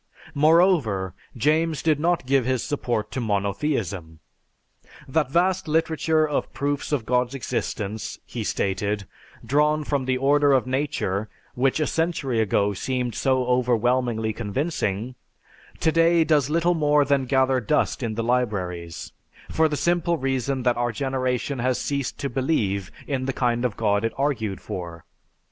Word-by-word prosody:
Moreover, 150 - +3 0.2
James 155 +4 +1
did 155 -3 +2
not 170 -2 +1
give 135 0 +3
his 130 -1 0
support 120 -7 -2
to 130 - -3
monotheism. 100 - -2 0.9
"That 140 0 +1
vast 180 +4 +1
literature 160 0 +1
of 150 - -2
proofs 145 +1 -2
of 135 -7 0
God's 125 +2 +1
existence," 110 -4 -3
he - - -5
stated, 100 +1 -1 0.4
"drawn 150 +2 +2
from 140 -3 -1
the 130 0 +1
order 140 +2 +3
of 130 -2 +3
nature, 130 -7 -2 0.2
which 130 +4 +1
a 155 - +2
century 155 -7 -1
ago 105 -1 +1
seemed 125 +3 -2
so 130 -1 +1
overwhelmingly 120 -2 +1
convincing, 115 - -2 0.7
today 165 +1 +4
does 150 -3 +2
little 170 +3 +2
more 150 -3 +3
than 140 -2 +1
gather 130 0 +3
dust 110 - 0
in 115 -3 -2
the 115 - -2
libraries, 95 -9 -2 0.4
for 160 0 +3
the 150 - -2
simple 170 0 +1
reason 135 -1 -1
that 120 -1 +2
our 120 0 0
generation 130 +1 -2
has 125 +1 0
ceased 140 -3 -2
to 140 - -2
believe 115 - -1
in 135 -3 -2
the 135 - -1
kind 120 -1 0
of 120 -4 -1
God 105 -1 +1
it 115 - -1
argued 120 -9 -1
for. 85 -3 -7
130 Hz, 145 wpm, -24 LUFS, 110-150 Hz, 0.9 s, today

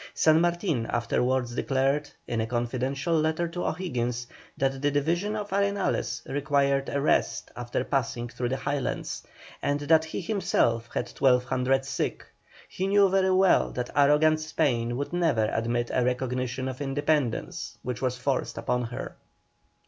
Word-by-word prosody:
San 160 0 +5
Martin 170 - 0
afterwards 125 +1 0
declared, 135 +3 0 0.2
in 115 -1 -1
a 110 - -2
confidential 130 +6 -1
letter 160 +2 +1
to 175 +1 -4
O'Higgins, 125 -9 -2 0.3
that 135 0 0
the 145 - +3
division 170 +9 0
of 210 -2 -4
Arenales 200 0 0
required 140 -1 +1
a 140 - -1
rest 145 - +1
after 120 +1 -2
passing 120 -3 -1
through 120 +1 -3
the 130 - -1
Highlands, 140 -1 -3 0.4
and 145 +1 0
that 160 +2 +4
he 160 - -5
himself 120 - 0
had - - -3
twelve 125 -2 +4
hundred 130 +1 +1
sick. 135 - -3 0.4
He 190 - -3
knew 200 0 +5
very 190 0 +3
well 190 0 +4
that 125 -1 -3
arrogant 150 +2 +4
Spain 125 -7 0
would 145 +5 -4
never 160 -11 +2
admit 120 +1 -1
a 125 - +2
recognition 125 +1 -1
of 130 +1 -5
independence 145 -2 -1
which 125 -1 -4
was 130 -1 0
forced 135 +1 -1
upon 125 0 -1
her. 120 +3 -6
135 Hz, 150 wpm, -27 LUFS, 125-160 Hz, 0.4 s, San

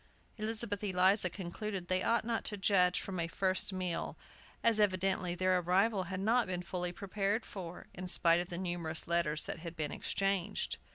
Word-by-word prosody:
Elizabeth 215 -2 -3
Eliza 190 0 +4
concluded 190 +1 -5
they 185 +1 +1
ought 230 +2 +1
not 230 -1 -1
to 210 - -2
judge 185 -2 +3
from 190 -2 -4
a 165 - 0
first 185 +3 +1
meal, 185 -3 -2 0.5
as 230 -2 +4
evidently 185 -3 +1
their 185 0 +2
arrival 190 +3 +2
had 185 +1 -4
not 230 +5 +2
been 180 -1 -3
fully 180 0 -3
prepared 200 +4 -2
for, 180 -3 -8
in 185 +1 -6
spite 170 -1 +4
of 175 - -4
the 175 - -3
numerous 175 -3 -1
letters 170 -3 +2
that - - -4
had 170 0 -7
been 150 -3 -2
exchanged. 195 -2 -1
185 Hz, 175 wpm, -33 LUFS, 175-200 Hz, 0.5 s, Eliza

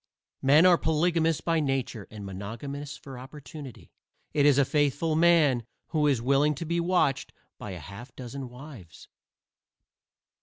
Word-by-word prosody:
Men 145 +5 +6
are 180 -2 +6
polygamous 165 0 +1
by 165 -1 +1
nature 135 -7 -2
and 105 -2 -9
monogamous 135 +10 -6
for 135 -4 -10
opportunity. 140 -1 -11 0.4
It 145 -1 +4
is 140 -2 +5
a 140 - +4
faithful 145 +3 +1
man 160 -7 +4 0.3
who 150 -2 +1
is 130 -5 +1
willing 140 +3 +3
to 165 - -5
be 170 +2 -1
watched 170 -6 +1 0.3
by 105 - -7
a 90 - -7
half 100 - -11
dozen 130 +1 -7
wives. 125 - -12
140 Hz, 145 wpm, -27 LUFS, 125-155 Hz, 0.4 s, Men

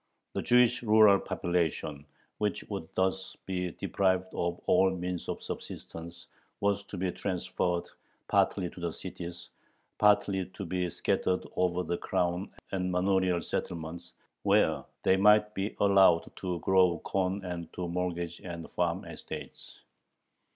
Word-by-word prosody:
The - - -1
Jewish 125 0 +4
rural 110 -3 +6
population, 80 -4 -2 0.3
which 105 -1 -1
would 100 -6 -5
thus 95 0 -1
be 90 -1 -2
deprived 95 -1 0
of 85 0 -1
all 95 +1 +5
means 90 -1 -4
of - - -4
subsistence, 85 +1 -7 0.3
was 100 0 +1
to 100 - -8
be 90 0 0
transferred 90 -2 -1 0.4
partly 95 -3 +2
to - - -12
the 85 -2 -2
cities, 85 0 -7 0.5
partly 100 -2 +3
"to 100 - -5
be 90 0 -1
scattered 90 +2 0
over 90 0 +1
the 85 +1 -2
crown 90 0 -1 0.2
and 90 -1 -1
manorial 90 -1 +2
settlements, 85 +1 -4 0.3
where - - +3 0.2
they 95 - +4
might 105 +1 +5
be 95 +2 -3
allowed 95 -4 +5
to 90 -2 -2
grow 95 -2 +4
corn 95 0 -1
and 85 -2 -5
to 90 -1 -3
mortgage 85 -1 -3
and 85 -2 -7
farm - - -1
estates." - - -9
90 Hz, 135 wpm, -30 LUFS, 85-95 Hz, 0.5 s, rural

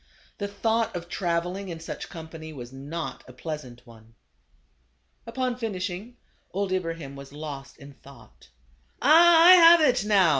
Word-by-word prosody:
The 205 - -2
thought 220 +1 -1
of 175 -1 -6
travel 175 0 -2
ing 195 -1 -7
in 165 -2 -6
such 160 - -7
company 160 -1 -9
was 125 -2 -10
not 140 +1 -6
a 130 - -13
pleasant 130 -4 -8
one. 115 -1 -18 1.1
Upon 250 +1 -2
finishing, 205 0 -5 0.3
old 195 0 -3
Ibrahim 165 -6 -4
was 140 0 -11
lost 145 -2 -8
in 140 0 -13
thought. 120 - -18 0.3
" - - -39
Ah, 330 +3 +7
I 360 - +10
have 340 -2 +8
it 255 -7 +3
now 200 -5 +4
170 Hz, 155 wpm, -25 LUFS, 140-220 Hz, 1.1 s, I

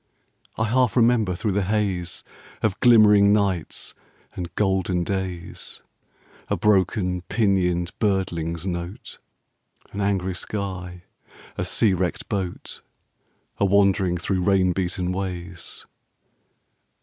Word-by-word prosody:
I 110 - +1
half 125 +2 +2
remember 115 -6 +3
through 105 +3 -1
the 100 +2 +1
haze 95 -3 -1 0.4
Of 105 -3 0
glimmering 105 -4 +6
nights 100 -6 0 0.4
and 90 -2 -5
golden 95 -3 +1
days, 95 -2 -5 0.6
A - - -1
broken 95 -2 +2
pinioned 90 -5 +1
birdling's 85 -5 -1
note, 85 +1 -5 0.7
An 100 - -4
angry 95 -2 0
sky, 90 -2 -5 0.5
a - - -2
sea 105 -4 +2
wrecked 90 -1 -2
boat, 95 -4 -4 0.8
A 100 - +3
wandering 95 -2 +3
through 90 +2 -1
rain 95 -1 +3
beaten 90 0 -2
ways! 90 -2 -6
95 Hz, 105 wpm, -24 LUFS, 90-100 Hz, 0.8 s, glimmering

